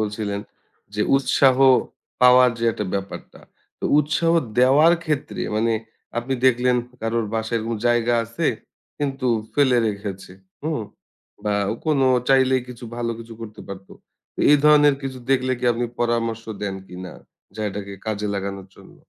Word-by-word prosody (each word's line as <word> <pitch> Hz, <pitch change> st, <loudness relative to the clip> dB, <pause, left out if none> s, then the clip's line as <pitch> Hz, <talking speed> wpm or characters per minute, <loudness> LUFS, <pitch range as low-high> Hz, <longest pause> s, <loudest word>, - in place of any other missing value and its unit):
বলছিলেন 105 Hz, -1 st, -3 dB, 0.5 s
যে, 105 Hz, -, -2 dB, 0.2 s
উৎসাহ 135 Hz, -1 st, +3 dB, 0.7 s
পাওয়ার 125 Hz, 0 st, +7 dB
যে 115 Hz, -, -2 dB
একটা 105 Hz, -, -4 dB
ব্যাপারটা। 100 Hz, 0 st, -6 dB, 0.4 s
তো -, -, -7 dB
উৎসাহ 155 Hz, +3 st, +1 dB, 0.3 s
দেওয়ার 140 Hz, +7 st, +6 dB
ক্ষেত্রে 150 Hz, -3 st, -3 dB, 0.2 s
মানে 115 Hz, +1 st, +1 dB, 0.5 s
আপনি 130 Hz, +3 st, -2 dB
দেখলেন 125 Hz, 0 st, +3 dB, 0.2 s
কারোর 115 Hz, 0 st, -1 dB
বাসায় 110 Hz, +1 st, -1 dB
কোন 115 Hz, -, -2 dB
জায়গা 120 Hz, 0 st, +2 dB
আছে, 115 Hz, +1 st, -3 dB, 0.5 s
কিন্তু 135 Hz, -2 st, -2 dB, 0.3 s
ফেলে 130 Hz, -4 st, +3 dB
রেখেছে। 100 Hz, -3 st, -6 dB, 0.3 s
হু? 155 Hz, -, -2 dB, 0.7 s
বা, 105 Hz, -, 0 dB, 0.2 s
অ -, -, -3 dB
কোনো 140 Hz, -4 st, +3 dB, 0.2 s
চাইলেই 130 Hz, -1 st, +4 dB
কিছু 120 Hz, -1 st, -9 dB
ভালো 120 Hz, -1 st, -2 dB
কিছু 115 Hz, 0 st, -10 dB
করতে 110 Hz, -1 st, -9 dB
পারত। 95 Hz, 0 st, -8 dB, 0.5 s
তো -, -, -27 dB
এই 150 Hz, -, +7 dB
ধরনের 150 Hz, -1 st, +6 dB
কিছু 130 Hz, -1 st, -5 dB
দেখলে 130 Hz, -1 st, +2 dB
কি 125 Hz, -, -5 dB
আপনি 120 Hz, +1 st, -2 dB, 0.2 s
পরামর্শ 115 Hz, -1 st, 0 dB, 0.2 s
দেন 100 Hz, -1 st, -2 dB
কিনা 90 Hz, 0 st, -8 dB, 0.5 s
জায়গাটাকে 100 Hz, -1 st, -4 dB
কাজে 105 Hz, -1 st, -2 dB
লাগানোর 100 Hz, -1 st, -5 dB
জন্য? -, -, -16 dB
120 Hz, 145 wpm, -22 LUFS, 105-130 Hz, 0.7 s, পাওয়ার